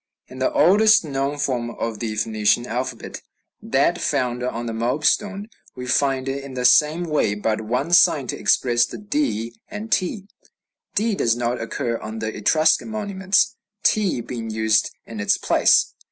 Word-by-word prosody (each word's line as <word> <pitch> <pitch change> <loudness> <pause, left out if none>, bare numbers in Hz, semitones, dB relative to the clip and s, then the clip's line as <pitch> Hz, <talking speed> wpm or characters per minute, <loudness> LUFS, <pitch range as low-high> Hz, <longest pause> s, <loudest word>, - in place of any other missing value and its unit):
In 130 - -11
the 130 - +1
oldest 215 +4 +5
known 140 0 -2
form 125 -5 -2
of 115 -2 -5
the 110 -1 -3
Phoenician 110 +2 +1
alphabet, 125 +2 -5 0.4
that - - +1
found 125 -1 -1
on 120 -1 -3
the 115 - -4
Moab 120 +7 -2
stone, 205 +2 +1 0.3
we 125 - -7
find 135 0 0
in 135 0 -5
the 125 -1 -2
same 150 +7 +4
way 150 -11 0
but 110 +1 -1
one 125 +9 -2
sign 170 -6 +5
to - - -4
express 120 +3 +2
the - - -8
d 205 - -2
and 210 +1 -8
t. 185 +2 -1 0.7
D 225 +1 +1
does 115 - +1
not 120 0 -2
occur 115 0 -3
on 110 +1 -7
the 110 0 -4
Etruscan 155 - +2
monuments, 205 +1 0 0.3
t 195 - +1
being 115 -1 -6
used 110 0 +1 0.2
in 115 -2 -8
its 100 - +2
place. - - +3
130 Hz, 165 wpm, -22 LUFS, 115-175 Hz, 0.7 s, oldest